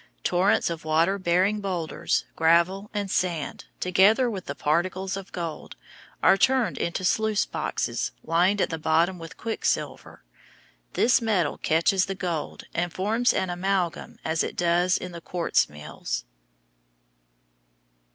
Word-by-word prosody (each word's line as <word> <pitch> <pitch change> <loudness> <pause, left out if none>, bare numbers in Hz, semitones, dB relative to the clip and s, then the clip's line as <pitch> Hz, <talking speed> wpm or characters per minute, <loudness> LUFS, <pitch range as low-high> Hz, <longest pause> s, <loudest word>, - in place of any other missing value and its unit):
Torrents 185 0 +2
of 165 -1 -6
water 165 +5 +2
bearing 185 +4 +2
boulders, 180 -5 -1
gravel, 170 +5 +2
and 205 -3 -3
sand, 170 -5 -2
together 205 +7 +4
with 190 -4 -6
the 140 - -4
particles 180 +6 0
of 195 -1 -8
gold, 165 -3 -6 0.5
are 195 - +6
turned 255 +1 +2
into 170 +2 -2
sluice 215 +2 +2
boxes - - -2
lined 180 +5 +2
at - - 0
the 160 - -3
bottom 165 +4 +2
with 165 -1 -10
quick 225 -1 -4
silver. - - -2 0.7
This 250 +2 +3
metal 200 -9 0
catches 170 +4 +2
the 195 - -3
gold 175 -5 -4
and 175 +1 -1
forms 220 +7 +1
an 185 -1 -1
amalgam 180 -1 -2
as 160 0 +1
it - - -4
does 175 +1 +2
in 180 - -7
the 170 -1 -9
quartz 175 0 0
mills. 75 -1 -5
180 Hz, 140 wpm, -25 LUFS, 165-195 Hz, 0.7 s, are